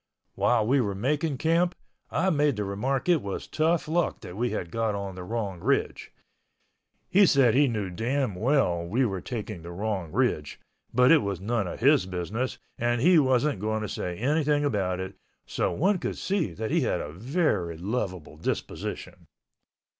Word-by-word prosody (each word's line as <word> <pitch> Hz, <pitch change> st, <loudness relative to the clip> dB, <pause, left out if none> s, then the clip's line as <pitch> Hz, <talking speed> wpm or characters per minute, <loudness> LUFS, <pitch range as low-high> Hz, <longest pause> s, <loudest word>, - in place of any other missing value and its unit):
While 115 Hz, -3 st, +2 dB
we 135 Hz, +4 st, +3 dB
were 100 Hz, -4 st, -2 dB
making 145 Hz, +7 st, 0 dB
camp, 170 Hz, +4 st, +2 dB, 0.3 s
I 190 Hz, +3 st, +1 dB
made 145 Hz, -3 st, +2 dB
the 105 Hz, -, -2 dB
remark 125 Hz, -, -2 dB
it 170 Hz, -5 st, +4 dB
was 100 Hz, -1 st, -5 dB
tough 160 Hz, +1 st, +1 dB
luck 170 Hz, +2 st, 0 dB
that 90 Hz, -4 st, -9 dB
we 120 Hz, +4 st, 0 dB
got 110 Hz, +4 st, -2 dB
on 100 Hz, -1 st, -4 dB
the 90 Hz, 0 st, -8 dB
wrong 100 Hz, -3 st, -3 dB
ridge. -, -, -1 dB, 1.0 s
He 200 Hz, +1 st, +5 dB
said 135 Hz, -7 st, +5 dB
he 140 Hz, +2 st, +4 dB
knew 105 Hz, -6 st, -2 dB
damn 120 Hz, +5 st, -1 dB
well 100 Hz, -5 st, +1 dB
we 115 Hz, +10 st, +1 dB
were 95 Hz, -5 st, -2 dB
taking 110 Hz, -7 st, -5 dB
the 85 Hz, -, -9 dB
wrong 95 Hz, -2 st, -3 dB
ridge, 75 Hz, -1 st, 0 dB, 0.3 s
but 125 Hz, +3 st, +5 dB
it 165 Hz, -, +7 dB
was 100 Hz, -6 st, -3 dB
none 105 Hz, 0 st, -1 dB
of 90 Hz, -, -7 dB
his 135 Hz, -6 st, +4 dB
business, 95 Hz, +8 st, -3 dB, 0.2 s
and 120 Hz, 0 st, +1 dB
he 170 Hz, +6 st, +6 dB
wasn't 130 Hz, -1 st, +2 dB
going 110 Hz, +1 st, -1 dB
to -, -, -2 dB
say 90 Hz, -2 st, -4 dB
anything 145 Hz, +3 st, +1 dB
about 95 Hz, -8 st, 0 dB
it, 95 Hz, +1 st, -5 dB, 0.3 s
so -, -, -1 dB
one 190 Hz, +4 st, +1 dB
can -, -, -3 dB
see 190 Hz, -5 st, -1 dB
he 110 Hz, 0 st, 0 dB
had -, -, 0 dB
a 75 Hz, -, -5 dB
very 105 Hz, -, 0 dB
lovable 90 Hz, -5 st, -4 dB
disposition. 80 Hz, -, -5 dB
115 Hz, 175 wpm, -27 LUFS, 95-145 Hz, 1.0 s, it